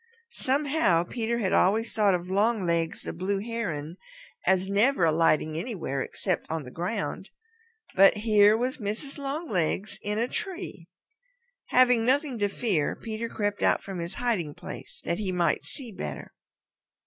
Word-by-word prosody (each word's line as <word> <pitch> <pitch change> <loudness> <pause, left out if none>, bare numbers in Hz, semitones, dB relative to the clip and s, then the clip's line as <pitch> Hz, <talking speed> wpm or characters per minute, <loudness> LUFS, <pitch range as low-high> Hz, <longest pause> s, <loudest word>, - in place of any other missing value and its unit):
Somehow 275 - +2
Peter 230 +5 -2
had 200 -5 0
always 220 +5 +3
thought 205 -4 +3
of 180 +1 -5
Longlegs 190 -6 +1
the - - -5
Blue 190 +4 -1
Heron 190 -8 -4 0.5
as 190 0 +3
never 205 +1 +3
alighting 155 -1 +2
anywhere 165 - -3
except 185 +4 -2
on 160 -1 -2
the 125 - -10
ground. 175 - -3 0.6
But 195 +2 +6
here 210 -1 +5
was 255 +4 -2
Mrs. 225 +7 -5
Longlegs 245 - -2
in 210 +1 -2
a 235 +2 +1
tree. 360 - -5 0.8
Having 250 -2 +5
nothing 265 0 +1
to 205 - +2
fear, 195 -9 0
Peter 225 0 -5
crept 205 -2 -2
out - - +3
from 195 -2 -6
his 170 +2 -5
hiding 195 -12 -1
place - - -9
that 170 - -1
he 200 -3 -1
might 175 -4 +1
see 255 -6 -8
better. 195 - -6
205 Hz, 150 wpm, -27 LUFS, 175-235 Hz, 0.8 s, But